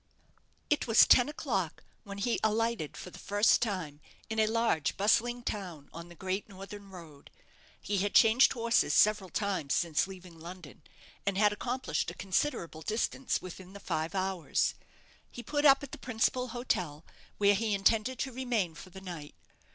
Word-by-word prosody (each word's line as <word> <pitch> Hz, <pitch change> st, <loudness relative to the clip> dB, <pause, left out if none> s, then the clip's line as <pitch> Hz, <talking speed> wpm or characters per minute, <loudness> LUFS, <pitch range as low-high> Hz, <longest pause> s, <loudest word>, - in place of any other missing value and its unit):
It 295 Hz, -, +1 dB
was 225 Hz, -1 st, +7 dB
ten 250 Hz, +3 st, +6 dB
o'clock 195 Hz, -, -3 dB, 0.2 s
when 200 Hz, -1 st, -7 dB
he 230 Hz, +4 st, 0 dB
alighted 220 Hz, -6 st, 0 dB
for 180 Hz, -, -8 dB
the -, -, -12 dB
first 205 Hz, +2 st, +3 dB
time 180 Hz, -10 st, -3 dB, 0.3 s
in 220 Hz, -, -1 dB
a 215 Hz, -, +4 dB
large, 225 Hz, -9 st, +1 dB
bustling 240 Hz, +4 st, +2 dB
town 180 Hz, -11 st, -5 dB
on 170 Hz, +1 st, -9 dB
the 175 Hz, -, -13 dB
great 190 Hz, +5 st, -3 dB
northern 200 Hz, +1 st, -10 dB
road. 165 Hz, -6 st, -12 dB, 0.5 s
He 205 Hz, -1 st, -1 dB
had 200 Hz, +2 st, -1 dB
changed 225 Hz, +4 st, +6 dB
horses 230 Hz, -, +2 dB
several 210 Hz, -3 st, +4 dB
times 185 Hz, -6 st, -1 dB
since 170 Hz, 0 st, +1 dB
leaving 180 Hz, -3 st, -12 dB
London, 170 Hz, -2 st, -10 dB, 0.4 s
and 200 Hz, -1 st, -1 dB
had 210 Hz, 0 st, +4 dB
accomplished 250 Hz, +5 st, -2 dB
a -, -, -8 dB
considerable 190 Hz, -, -2 dB
distance 225 Hz, +7 st, -1 dB
within 185 Hz, +1 st, -10 dB
the 200 Hz, -, -9 dB
five 160 Hz, -1 st, -3 dB
hours. 190 Hz, -3 st, 0 dB, 0.6 s
He 240 Hz, -, -9 dB
put 290 Hz, +2 st, -1 dB
up 275 Hz, 0 st, +7 dB
at 280 Hz, -, -8 dB
the -, -, -8 dB
principal 250 Hz, +1 st, 0 dB
hotel, 180 Hz, -, -3 dB, 0.3 s
where 205 Hz, 0 st, +5 dB
he 210 Hz, 0 st, 0 dB
intended 220 Hz, +5 st, +2 dB
to 265 Hz, -2 st, -3 dB
remain 235 Hz, -9 st, -1 dB
for 175 Hz, +4 st, -11 dB
the 190 Hz, +1 st, -11 dB
night. 170 Hz, -6 st, -8 dB
200 Hz, 165 wpm, -31 LUFS, 180-230 Hz, 0.6 s, was